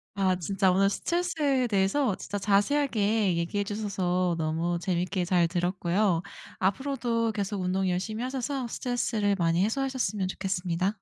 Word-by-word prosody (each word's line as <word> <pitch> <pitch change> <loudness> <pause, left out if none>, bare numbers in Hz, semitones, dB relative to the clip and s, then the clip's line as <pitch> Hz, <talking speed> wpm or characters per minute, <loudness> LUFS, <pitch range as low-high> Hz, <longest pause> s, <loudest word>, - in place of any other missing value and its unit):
아 190 -2 +2
진짜 190 +1 +1
오늘 195 +2 +3
스트레스에 300 - 0
대해서 200 +3 +1
진짜 205 - -5
자세하게 210 -2 +2
얘기해 185 +4 -1
주셔서 185 -4 -1
너무 165 +2 -1
재밌게 180 0 -1
잘 175 -2 +3
들었고요. 175 +1 +1 0.4
앞으로도 230 +2 0
계속 200 -1 -2
운동 185 +1 0
열심히 215 +6 -2
하셔서 260 0 -2
스트레스를 225 -4 0
많이 170 +1 +2
해소하셨으면 245 -5 -1
좋겠습니다. 185 0 -1
195 Hz, 365 characters per minute, -28 LUFS, 180-230 Hz, 0.4 s, 오늘